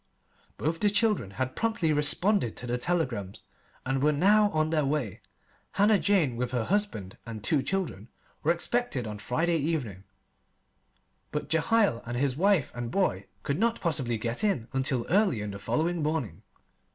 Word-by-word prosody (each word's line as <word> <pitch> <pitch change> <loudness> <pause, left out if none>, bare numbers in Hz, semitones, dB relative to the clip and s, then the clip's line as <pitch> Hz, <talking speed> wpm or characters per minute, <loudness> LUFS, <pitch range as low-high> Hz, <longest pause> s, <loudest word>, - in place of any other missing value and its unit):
Both 165 +2 -1
the 210 - +3
children 205 - +1
had 130 0 -2
promptly 220 -9 +1
responded 155 - +2
to - - -5
the 125 0 -2
telegrams, 120 - -2 0.4
and 135 0 0
were 150 +2 +4
now 205 +8 +4
on 155 -3 0
their 155 -2 +2
way. 135 -8 -2 0.5
Hannah 205 +1 +4
Jane, 175 -12 +2
with 125 0 -1
her 120 -2 0
husband 185 - -2
and 110 -2 -8
two 150 +2 +2
children, 155 - -3 0.3
were 160 - +3
expected 175 - -1
on 105 -1 -6
Friday 165 +10 0
evening; 140 - -2 1.3
but 150 - -4
Jehiel 165 - +2
and 120 0 -4
his 135 0 0
wife 185 -2 +2
and 120 -1 -4
boy 110 - 0 0.2
could 140 +4 -1
not 230 +1 +1
possibly 135 -9 0
get 115 - -3
in 170 - 0
until 130 -2 +1
early 185 - +2
on 105 - -4
the 100 - -7
following 165 - -1
morning. 150 - -2
150 Hz, 165 wpm, -28 LUFS, 120-190 Hz, 1.3 s, were